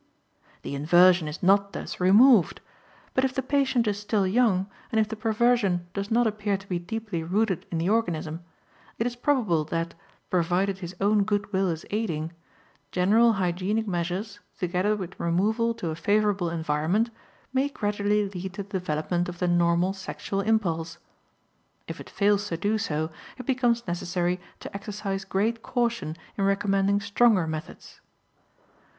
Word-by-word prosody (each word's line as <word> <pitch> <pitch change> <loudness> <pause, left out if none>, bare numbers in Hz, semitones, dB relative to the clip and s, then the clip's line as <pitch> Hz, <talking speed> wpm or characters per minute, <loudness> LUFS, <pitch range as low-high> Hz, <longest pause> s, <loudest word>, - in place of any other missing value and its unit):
The - - -5
inversion 175 +4 +5
is 150 +4 -7
not 200 +2 +4
thus - - -6
removed. 205 +3 +6 0.5
But 260 - +2
if 265 -1 0
the 265 - -1
patient 265 -3 +1
is 205 -1 -1
still 205 -1 0
young, 195 -2 +2 0.3
and 220 - +2
if 215 - +2
the 220 - -5
perversion 220 -4 +1
does 200 0 -3
not 235 +1 +3
appear 210 -2 0
to 195 +1 -15
be 180 -2 -1
deeply 210 -1 -4
rooted 190 +2 0
in 170 - -1
the 165 +3 0
organism, 170 -7 -1 0.5
it 225 - -1
is 245 -1 -2
probable 240 - +1
that 165 +2 -3 0.4
provided 185 +2 +1
his 180 -1 -7
own 205 +1 +3
good 205 0 -2
will 190 0 +2
is 165 -1 -4
aiding 170 -7 -2 0.6
general 220 +6 +4
hygienic 195 +3 -1
measures, 185 +4 -3 0.2
together 185 +3 0
with 185 -3 -7
removal 215 +7 +1
to 170 -7 -3
a - - -4
favorable 205 0 +1
environment, 165 +7 0 0.4
may 270 +2 +2
gradually 205 -3 0
lead 190 -1 -6
to 200 - -4
the 195 -1 -4
development 175 +2 -1
of 175 - -7
the 180 - 0
normal 175 +1 +2
sexual 195 0 -4
impulse. 170 -7 0 0.9
If - - -6
it - - -11
fails 205 0 +2
to 165 - -3
do 205 +5 0
so, 160 -6 -2 0.3
it 255 - -8
becomes 245 -3 +1
necessary 175 +1 -1 0.2
to - - -8
exercise 200 -1 -4
great 225 +4 0
caution 235 -12 -1 0.2
in - - +2
recommending 195 0 +2
stronger 205 -2 +3
methods. 160 0 -7
195 Hz, 155 wpm, -26 LUFS, 175-220 Hz, 0.9 s, removed